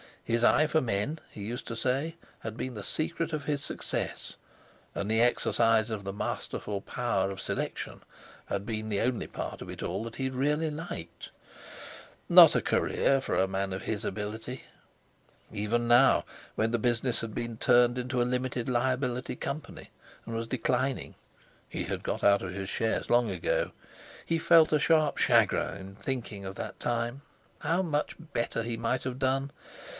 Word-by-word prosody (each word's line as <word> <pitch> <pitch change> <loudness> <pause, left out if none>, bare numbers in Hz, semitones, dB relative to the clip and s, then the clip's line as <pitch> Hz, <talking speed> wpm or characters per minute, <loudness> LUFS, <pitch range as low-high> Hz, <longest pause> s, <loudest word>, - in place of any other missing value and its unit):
His 115 0 0
eye 155 - +5
for 155 +1 +2
men, 120 +7 -1
he 105 - -8
used 120 +4 -5
to 115 - -4
say, 135 +7 0 0.2
had 110 -1 -6
been 130 +1 -4
the 105 -3 -7
secret 165 +1 -2
of 150 -2 -2
his 145 0 -1
success, - - -4 0.6
and 100 +2 -2
the 110 +1 +4
exercise 115 -2 +3
of 105 -3 -4
this 100 0 -4
masterful 105 0 -3
power 100 -4 0
of 95 -1 -6
selection - - -4 0.4
had 100 0 -3
been 110 -1 -3
the 100 -2 0
only 125 -1 0
part - - -5
of - - -7
it - - -6
all 100 - -2
that 115 - -7
he 135 - -4
had 130 0 -1
really 150 +4 +1
liked. 150 - -7 1.0
Not - - +9
a - - +3
career 135 - +2
for - - -2
a 95 - +3
man 95 0 -2
of 95 - -5
his 110 0 -3
ability. 110 +4 -4 0.9
Even 110 +3 0
now, 120 +3 +6 0.3
when 110 +1 +1
the 120 - +1
business 120 +1 +1
had 110 -2 -5
been 115 -1 -3
turned 120 +1 +4
into 125 0 -1
a - - +5
Limited 125 0 -1
Liability 125 0 0
Company, 150 +4 -6 0.3
and 115 - -6
was 115 0 -2
declining 130 +2 -1 0.5
(he - - -4
had - - -4
got - - -2
out 100 0 +5
of 90 -1 -5
his 95 0 -4
shares 110 +2 -1
long 120 -2 +4
ago), 90 -4 0 0.5
he 165 0 +1
felt 165 -1 +6
a 150 - +4
sharp 155 -1 +3
chagrin - - +3
in 95 0 -9
thinking 115 -5 -4
of 95 0 -6
that - - -6
time. 120 +3 -1 0.4
How 170 +3 +1
much 150 -4 -1
better 120 -7 -2
he 115 0 -3
might 120 +2 -1
have 130 0 -4
done! 135 +1 +1
120 Hz, 175 wpm, -29 LUFS, 110-135 Hz, 1.0 s, Not